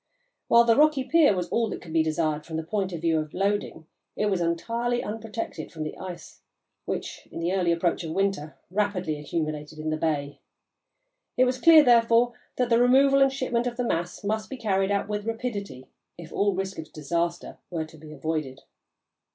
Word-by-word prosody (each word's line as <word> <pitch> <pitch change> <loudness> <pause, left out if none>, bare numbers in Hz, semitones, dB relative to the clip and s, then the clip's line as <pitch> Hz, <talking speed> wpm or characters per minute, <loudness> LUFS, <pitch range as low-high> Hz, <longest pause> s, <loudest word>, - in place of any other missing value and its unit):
While 235 0 +6
the 230 -1 +4
rocky 300 -1 +4
pier 290 -4 +4
was 180 -1 -2
all 230 -1 +1
that - - -5
could 165 -3 -9
be 165 - +4
desired 155 -1 0
from 160 -1 -5
the 160 - -3
point 190 +2 -2
of 170 -2 -5
view 165 -1 +2
of 155 -1 -6
loading, 195 -4 -1 0.3
it 210 -1 0
was 185 -2 0
entirely 230 +9 -1
unprotected 225 +1 -5
from 155 -2 -5
the 155 - -5
ice 180 -2 -9 0.4
which, - - -5
in - - -6
the 170 +2 -1
early 180 -3 +2
approach 170 +1 0
of 165 - -5
winter, 190 -5 -1
rapidly 185 -6 -1
accumulated 155 0 -4
in 155 0 -3
the 155 - -1
bay. 145 -3 -2 1.0
It 255 - +5
was 255 0 -1
clear, 320 -2 +8
therefore, 235 -1 +4 0.2
that 245 -1 0
the 230 +1 +5
removal 275 +2 +5
and 270 0 +5
shipment 250 -3 -1
of 240 -1 -4
the 245 - -1
mass 175 -1 -2
must 215 -1 -2
be 265 - -6
carried 195 -4 0
out 200 -1 0
with 210 +1 -3
rapidity 210 - -4 0.3
if 170 -2 -10
all 200 -1 +1
risk 190 -1 -3
of 160 - -8
disaster 170 +3 -3
were 165 -3 -3
to 160 0 -15
be 155 0 -12
avoided. 155 -4 -3
190 Hz, 195 wpm, -26 LUFS, 160-235 Hz, 1.0 s, clear